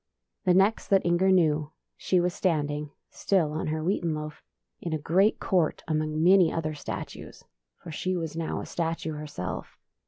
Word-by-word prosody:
The 180 Hz, -1 st, +4 dB
next 195 Hz, +4 st, +3 dB
that 195 Hz, -1 st, +3 dB
Inger 175 Hz, +2 st, +3 dB
knew, 155 Hz, -5 st, +2 dB, 0.2 s
she 185 Hz, -, +1 dB
was 175 Hz, 0 st, +1 dB
stand 155 Hz, -7 st, 0 dB
ing 150 Hz, 0 st, -4 dB
— -, -, -56 dB
still 175 Hz, -6 st, +1 dB
on 155 Hz, -, -3 dB
her 155 Hz, 0 st, -2 dB
wheaten 170 Hz, -2 st, 0 dB
loaf 150 Hz, 0 st, -6 dB, 0.2 s
— -, -, -52 dB
in 170 Hz, -, -3 dB
a -, -, +1 dB
great 185 Hz, +8 st, +2 dB
court 175 Hz, -5 st, +1 dB
among 155 Hz, 0 st, 0 dB
many 180 Hz, -2 st, +6 dB
other 155 Hz, -1 st, -2 dB
statues; 145 Hz, -2 st, -7 dB, 0.3 s
for 170 Hz, -, -10 dB
she 185 Hz, +4 st, -2 dB
was 160 Hz, -2 st, -4 dB
now 165 Hz, -1 st, -2 dB
a -, -, -7 dB
statue 165 Hz, -1 st, -3 dB
herself. 150 Hz, -12 st, -6 dB
165 Hz, 185 wpm, -27 LUFS, 155-180 Hz, 0.3 s, many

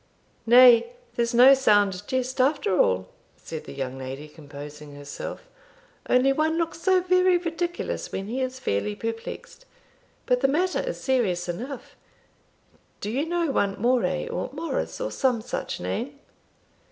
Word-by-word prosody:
"Nay, 245 Hz, -, +7 dB, 0.2 s
there's 235 Hz, 0 st, -1 dB
no 255 Hz, +3 st, +9 dB
sound 205 Hz, -8 st, +3 dB
jest 260 Hz, 0 st, -1 dB
after 275 Hz, -7 st, +1 dB
all," 95 Hz, -, +2 dB, 0.3 s
said 160 Hz, -1 st, -8 dB
the -, -, -9 dB
young 135 Hz, -1 st, -4 dB
lady, 135 Hz, +3 st, -7 dB
composing 150 Hz, -1 st, -11 dB
herself; 145 Hz, -, -8 dB, 0.6 s
"only 260 Hz, +2 st, +4 dB
one 315 Hz, +3 st, +1 dB
looks 330 Hz, 0 st, -2 dB
so 375 Hz, 0 st, +3 dB
very 365 Hz, 0 st, +4 dB
ridiculous 345 Hz, 0 st, -3 dB
when 195 Hz, -, -4 dB
he 245 Hz, +6 st, -3 dB
is 255 Hz, 0 st, -3 dB
fairly 100 Hz, -, -1 dB
perplexed. 225 Hz, -, -7 dB, 0.6 s
But 250 Hz, -1 st, +1 dB
the 270 Hz, -, +4 dB
matter 355 Hz, +7 st, +1 dB
is -, -, -4 dB
serious 210 Hz, -10 st, 0 dB
enough. 240 Hz, +10 st, -6 dB, 1.0 s
Do 205 Hz, -, -4 dB
you 280 Hz, +7 st, -1 dB
know 340 Hz, -3 st, 0 dB
one 200 Hz, -6 st, 0 dB
Moray, 215 Hz, -7 st, +1 dB
or 180 Hz, -, -3 dB
Morris, 325 Hz, +3 st, -3 dB
or -, -, -3 dB
some 255 Hz, -3 st, +1 dB
such 220 Hz, -, -5 dB
name?" 275 Hz, +5 st, -4 dB
250 Hz, 145 wpm, -25 LUFS, 180-290 Hz, 1.0 s, no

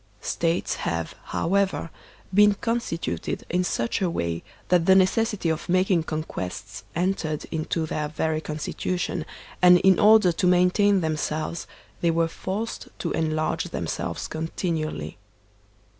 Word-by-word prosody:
States 170 Hz, +1 st, 0 dB
have, 85 Hz, 0 st, -2 dB
however, 190 Hz, -2 st, 0 dB, 0.4 s
been 205 Hz, +1 st, +6 dB
constituted 230 Hz, -6 st, -2 dB
in 180 Hz, +1 st, +2 dB
such 115 Hz, -7 st, -1 dB
a 185 Hz, -, +2 dB
way 85 Hz, -, -2 dB, 0.3 s
that 175 Hz, -2 st, +3 dB
the 190 Hz, -, +7 dB
necessity 195 Hz, +1 st, +2 dB
of 160 Hz, +1 st, -2 dB
making 185 Hz, -1 st, +3 dB
conquests 105 Hz, -, -5 dB
entered 170 Hz, -4 st, -1 dB
into 160 Hz, 0 st, -1 dB
their 150 Hz, -1 st, -2 dB
very 155 Hz, 0 st, -1 dB
constitution, 160 Hz, +4 st, -3 dB, 0.3 s
and 180 Hz, 0 st, +8 dB
in 190 Hz, -2 st, +5 dB
order 210 Hz, -3 st, +6 dB
to 180 Hz, +2 st, 0 dB
maintain 180 Hz, +2 st, +4 dB
themselves 155 Hz, +1 st, -2 dB, 0.3 s
they 170 Hz, -, +3 dB
were 165 Hz, 0 st, +2 dB
forced 195 Hz, +7 st, -4 dB
to 170 Hz, -, -3 dB
enlarge 155 Hz, -1 st, 0 dB
themselves 85 Hz, -, -3 dB
continually. 160 Hz, -, -3 dB
170 Hz, 125 wpm, -25 LUFS, 155-190 Hz, 0.4 s, and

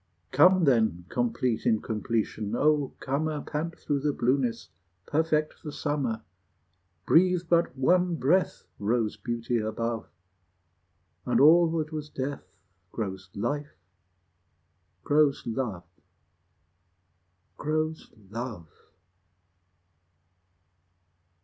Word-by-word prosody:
Come 180 Hz, +6 st, +6 dB
then, 110 Hz, -, +2 dB
complete 120 Hz, +1 st, 0 dB
incompletion, 110 Hz, 0 st, -1 dB
O 150 Hz, 0 st, +2 dB
comer, 150 Hz, +2 st, -1 dB
Pant 160 Hz, +3 st, -3 dB
through 145 Hz, -1 st, -1 dB
the 145 Hz, +2 st, +1 dB
blueness, 125 Hz, -2 st, 0 dB, 0.4 s
perfect 155 Hz, 0 st, 0 dB
the 150 Hz, -, -6 dB
summer! 140 Hz, -7 st, -2 dB, 0.8 s
Breathe 180 Hz, +1 st, +4 dB
but 170 Hz, -5 st, +2 dB
one 175 Hz, +6 st, +3 dB
breath 165 Hz, +7 st, +1 dB
Rose 110 Hz, +1 st, 0 dB
beauty 120 Hz, 0 st, -2 dB
above, 115 Hz, +1 st, -3 dB, 1.2 s
And -, -, +1 dB
all 165 Hz, +4 st, +7 dB
that 155 Hz, 0 st, -2 dB
was 150 Hz, -1 st, -5 dB
death 140 Hz, 0 st, -6 dB, 0.3 s
Grows 95 Hz, -4 st, -5 dB
life, 145 Hz, +8 st, -3 dB, 1.3 s
grows 145 Hz, -1 st, +2 dB
love, 110 Hz, -7 st, -3 dB, 1.8 s
Grows 155 Hz, +1 st, -2 dB, 0.2 s
love! 110 Hz, -8 st, -6 dB
135 Hz, 85 wpm, -28 LUFS, 115-155 Hz, 1.8 s, all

